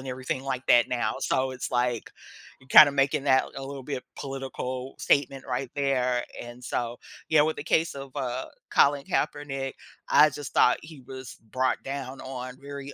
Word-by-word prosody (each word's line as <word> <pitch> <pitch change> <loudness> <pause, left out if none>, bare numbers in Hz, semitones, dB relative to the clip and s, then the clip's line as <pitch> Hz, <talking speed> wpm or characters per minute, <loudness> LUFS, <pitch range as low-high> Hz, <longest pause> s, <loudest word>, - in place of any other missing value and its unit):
and 130 - -8
everything 130 +1 -3
like 130 -2 -3
that 120 -1 +5
now, 120 -3 0
so 130 0 0
it's 130 - -5
like, 120 -2 0 0.5
you're 135 - -19
kinda 145 0 +9
making 140 0 +1
that 130 -2 +4
a 135 - -5
little 140 -1 -6
bit 130 -2 -4
political 135 -1 -5
statement 135 -1 +1
right 125 0 -3
there. 125 -3 +1 0.2
And 120 +1 -9
so 120 0 -3 0.3
yeah, 155 -2 +6
with 155 +1 +1
the - - -6
case 160 0 +1
of, 135 -1 -9
uh, 130 0 -2 0.2
Colin 140 0 +4
Kaepernick, 135 -2 -2 0.3
I 150 +1 +6
just 145 0 -7
thought 125 - +5
he 155 -3 -11
was 130 0 -9 0.2
brought 130 +2 0
down 135 -1 -6
on 130 0 -7
very 140 0 -8
135 Hz, 175 wpm, -27 LUFS, 125-140 Hz, 0.5 s, kinda